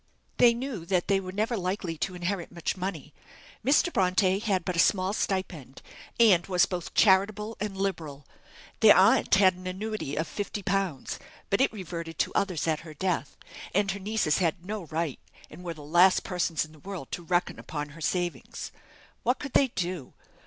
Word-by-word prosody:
They 235 -1 +6
knew 240 -7 -4
that 180 -2 +1
they 195 -1 +3
were 185 -1 -6
never 215 +5 -1
likely 185 -3 -2
to 185 +2 -2
inherit 175 0 -3
much 170 -1 -3
money. 180 -6 -5 0.5
Mr. 295 +7 +3
Bronte 185 +1 +2
had 195 -5 0
but 180 - -2
a - - 0
small 185 +1 +3
stipend, 185 - -3 0.4
and 200 -7 +5
was 180 -2 +4
both 180 -3 -5
charitable 210 +2 +3
and 200 -1 -4
liberal. 160 -8 -3 0.5
Their - - +8
aunt - - +5
had 190 -1 +5
an 185 +1 -9
annuity 190 -5 -4
of 160 +1 -1
50_l_., 195 -6 -2 0.3
but 200 - +3
it 270 - +3
reverted 170 -5 -6
to - - 0
others 180 -6 0
at 155 -1 +1
her 155 -2 -11
death, 185 +2 -2 0.4
and 200 0 +2
her 200 - -5
nieces 200 -6 +1
had 175 0 0
no 205 -2 -4
right, 155 -2 -3 0.3
and 180 - -11
were 170 -2 -5
the 150 - -11
last 175 +5 +5
persons 175 -4 -1
in 155 - -17
the 155 - -17
world 185 -5 -7
to - - -4
reckon 175 +1 0
upon 150 -1 -5
her 160 +3 -13
savings. 175 +3 -3 0.5
What 245 +3 +1
could 280 -3 -7
they 275 - +5
do? 180 - -4
185 Hz, 180 wpm, -28 LUFS, 170-200 Hz, 0.5 s, Their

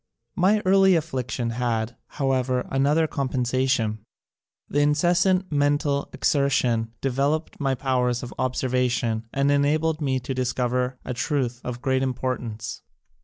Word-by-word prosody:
My 205 +3 +3
early 190 0 +5
affliction 125 -7 -2
had, 115 -1 -1 0.2
however, 130 -2 0
another 145 +4 +3
compensation. 130 -5 0 0.7
The 145 - 0
incessant 175 +5 +2
mental 145 -1 +1
exer 140 -2 +1
tion 115 -4 +1
developed 140 +4 -1
my 135 -2 +1
powers 125 -2 0
of 120 - -7
observation 125 -3 0
and 140 +1 +1
enabled 155 +3 +1
me 135 -3 0
to 135 +2 -4
discover 125 0 -1
a 125 - -3
truth 125 -2 -1
of 125 +1 -6
great 130 -2 +1
importance. 125 -4 -3
130 Hz, 120 wpm, -24 LUFS, 125-145 Hz, 0.7 s, early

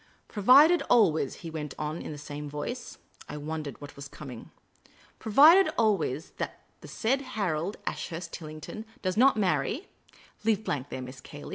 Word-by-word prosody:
" - - -36
Provided 275 - +6
always 170 - +3
" - - -16
he 165 - -5
went 150 -3 -5
on, 155 +2 -3
in - - -6
the 150 - -7
same 145 0 -7
voice. 150 - -5 0.3
I - - -5
wondered 150 -1 -5
what 145 -1 -10
was 140 0 -8
coming. 135 -5 -10 0.4
" - - -28
Provided 310 - +7
always 195 - +1
that - - -5 0.2
the - - -12
said 265 +4 0 0.2
Harold 180 -1 -1
Ashurst 170 0 -5
Tillington 155 +7 -8 0.2
does 185 -1 0
not 255 +1 +5
marry 190 - 0 0.5
leave 215 -1 +2
a - - -19
blank 145 -8 -3
there, 130 - -5
Miss 125 0 -10
Cayley. 145 +2 -10
160 Hz, 175 wpm, -28 LUFS, 150-220 Hz, 0.5 s, Provided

